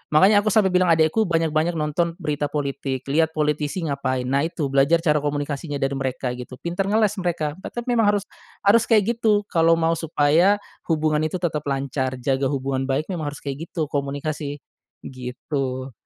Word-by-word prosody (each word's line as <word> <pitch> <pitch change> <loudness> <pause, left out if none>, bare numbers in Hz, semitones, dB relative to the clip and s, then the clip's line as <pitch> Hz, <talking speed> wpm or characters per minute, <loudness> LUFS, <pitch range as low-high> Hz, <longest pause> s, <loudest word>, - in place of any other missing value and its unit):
makanya 200 +5 +6
aku - - -3
sampe 210 -2 +4
bilang 180 -1 +3
adekku 160 +7 +3
banyak-banyak 165 0 +1
nonton 165 +2 -1
berita 150 -3 -1
politik, 140 -2 -3
liat 160 +3 +2
politisi 150 +3 -1
ngapain. 130 -3 -1
Nah, 140 +2 +1
itu 155 -4 -3
belajar 140 +5 +4
cara 150 -3 +3
komunikasinya 145 +1 -3
dari 135 0 0
mereka 130 -1 -2
gitu, 125 +1 -8
pinter 175 +3 -2
ngeles, 210 0 +2
mereka 160 -4 -1
tetep 240 +4 -6
memang 225 -3 +4
harus 200 - -1 0.4
harus 220 +3 +5
kayak 225 +1 +2
gitu, 210 -2 +3
kalo 165 -1 +4
mau 165 0 +1
supaya 165 +4 +3 0.3
hubungan 155 -2 +1
itu 170 - -6
tetep 155 -4 -1
lancar, 135 -1 -1
jaga 135 0 +1
hubungan 135 -1 -2
baik 145 +7 -1
memang 160 -5 -3
harus 145 - -12
kayak 140 +4 -5
gitu, 155 -4 -3
komunikasi 145 +1 -3 0.4
gitu. 130 +1 -4
150 Hz, 170 wpm, -23 LUFS, 140-170 Hz, 0.4 s, makanya